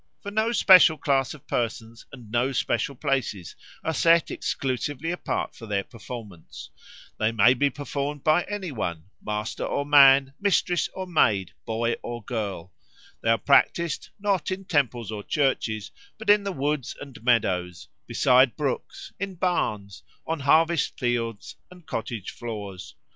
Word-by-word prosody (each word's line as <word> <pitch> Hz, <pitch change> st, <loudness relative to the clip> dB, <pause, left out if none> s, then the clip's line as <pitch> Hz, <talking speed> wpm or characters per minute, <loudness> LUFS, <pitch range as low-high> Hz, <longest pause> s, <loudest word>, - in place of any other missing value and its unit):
For 205 Hz, -, -5 dB
no 220 Hz, +2 st, +1 dB
special 185 Hz, -7 st, +7 dB
class 135 Hz, -1 st, 0 dB
of 145 Hz, -, -17 dB
persons 115 Hz, -1 st, -4 dB
and 120 Hz, -5 st, -12 dB
no 120 Hz, +3 st, +1 dB
special 125 Hz, +2 st, -1 dB
places 120 Hz, -9 st, -2 dB, 0.3 s
are 160 Hz, -, -1 dB
set 165 Hz, 0 st, +3 dB
exclusively 140 Hz, +4 st, -3 dB
apart 175 Hz, -, -3 dB
for 115 Hz, -, -10 dB
their 100 Hz, -2 st, -1 dB
performance; 105 Hz, -6 st, -10 dB, 0.5 s
they 110 Hz, +1 st, +2 dB
may 115 Hz, +2 st, +5 dB
be 140 Hz, +3 st, +1 dB
performed 145 Hz, 0 st, -4 dB
by 155 Hz, +3 st, +4 dB
any 195 Hz, -4 st, -5 dB
one, 85 Hz, -, -5 dB
master 105 Hz, +1 st, -3 dB
or 140 Hz, -, -2 dB
man, 135 Hz, -2 st, +6 dB
mistress 180 Hz, -3 st, +2 dB
or 190 Hz, -, -4 dB
maid, 105 Hz, -, +2 dB, 0.2 s
boy 115 Hz, +1 st, -1 dB
or 120 Hz, -1 st, -6 dB
girl; 100 Hz, -7 st, -4 dB, 0.5 s
they 115 Hz, -, 0 dB
are 115 Hz, -, +4 dB
practised, 155 Hz, +4 st, +2 dB
not 195 Hz, -5 st, 0 dB
in 190 Hz, +1 st, -4 dB
temples 125 Hz, -, 0 dB
or 105 Hz, -1 st, -5 dB
churches, 115 Hz, -5 st, -1 dB, 0.3 s
but 220 Hz, -1 st, +2 dB
in 205 Hz, -1 st, +4 dB
the 200 Hz, -, -1 dB
woods 145 Hz, -3 st, -2 dB
and 135 Hz, -5 st, -11 dB
meadows, 90 Hz, -8 st, 0 dB, 0.2 s
beside 130 Hz, 0 st, +4 dB
brooks, 140 Hz, -4 st, -4 dB
in 195 Hz, -1 st, -4 dB
barns, 105 Hz, -, -2 dB, 0.2 s
on 165 Hz, -1 st, -2 dB
harvest 160 Hz, +3 st, +2 dB
fields 115 Hz, -3 st, -2 dB
and 180 Hz, -2 st, -16 dB
cottage 115 Hz, -6 st, -5 dB
floors. 105 Hz, -5 st, -7 dB
130 Hz, 150 wpm, -25 LUFS, 110-160 Hz, 0.5 s, special